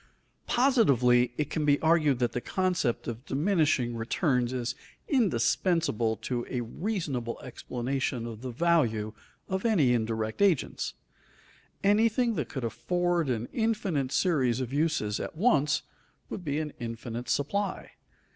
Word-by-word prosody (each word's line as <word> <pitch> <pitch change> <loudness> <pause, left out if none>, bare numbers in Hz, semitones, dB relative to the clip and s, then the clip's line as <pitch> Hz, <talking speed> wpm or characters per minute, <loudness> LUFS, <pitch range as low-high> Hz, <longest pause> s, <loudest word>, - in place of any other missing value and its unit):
Positively 130 - +4
it 150 0 -2
can 155 - -1
be 145 -1 +3
argued 160 -4 +3
that 120 -1 0
the 120 - -3
concept 180 -10 0
of 120 +1 -5
diminishing 145 -6 +1
returns 125 +2 0
is 125 -1 -2 0.3
indispensable 165 - +1
to 120 +3 -3
a 125 - -2
reasonable 135 - -3
explanation 125 0 -3
of 115 -2 -7
the 130 - -5
value 120 -7 +1 0.3
of 190 0 -2
any 165 - +3
indirect 110 - -1
agents. 190 -8 +1 0.9
Anything 225 +4 +3
that - - -3
could 130 -4 -5
afford 175 +5 0
an 120 -1 -1
infinite 210 - 0
series 130 -11 +2
of 130 0 -4
uses 145 -9 0
at - - -5
once 150 - +3 0.5
would 185 - -5
be 145 -3 -1
an 155 -1 -3
infinite 115 +1 -5
supply. 200 +9 -1
140 Hz, 130 wpm, -28 LUFS, 120-175 Hz, 0.9 s, Positively